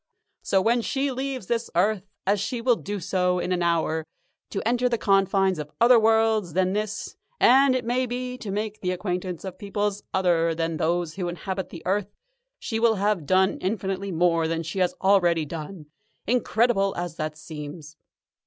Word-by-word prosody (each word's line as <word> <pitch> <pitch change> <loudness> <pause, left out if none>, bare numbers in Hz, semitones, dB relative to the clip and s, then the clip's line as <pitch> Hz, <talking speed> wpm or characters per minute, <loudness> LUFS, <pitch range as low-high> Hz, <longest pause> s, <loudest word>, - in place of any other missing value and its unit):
So 190 -1 +1
when 235 +3 +3
she 275 +4 -1
leaves 265 -3 -4
this 235 +3 -2
earth, 200 +2 +1 0.2
as 200 +1 +2
she 245 +5 -2
will 240 +1 +3
do 205 -1 -5 0.4
in 180 - -2
an 180 -1 0
hour 165 -2 +1
or 160 - -8 0.5
so, 195 - -2
to - - -3
enter 245 +1 +2
the 235 - 0
confines 195 -3 +2
of 150 -1 -5
other 240 0 +7
worlds 220 -5 +2
than 185 +1 +1
this 210 +1 -3 0.2
and, 265 +1 +6
it 250 -2 -2
may 250 +2 0
be, 250 +1 -4
to 210 - -6
make 210 +2 -3
the 180 - -1
acquaintance 180 -2 -3
of 185 -1 -7
peoples 205 0 -2
other 170 -3 +2
than 165 0 -2
those 170 +1 -1
who 180 -2 -2
inhabit 190 +2 -4
the 165 - -10
earth 195 +2 0 0.5
she 225 - -3
will 225 -1 +4
have 200 -6 0
done 190 0 +3
infinitely 195 0 -2
more 165 -1 +2
than 165 0 -2
she 165 +4 -4
has 180 -1 +1
already 175 -5 +4
done, 160 +2 -7 0.4
incredible 225 -3 +2
as 175 -2 -4
that 155 -1 -4
seems. 155 0 -9
195 Hz, 180 wpm, -25 LUFS, 175-220 Hz, 0.5 s, other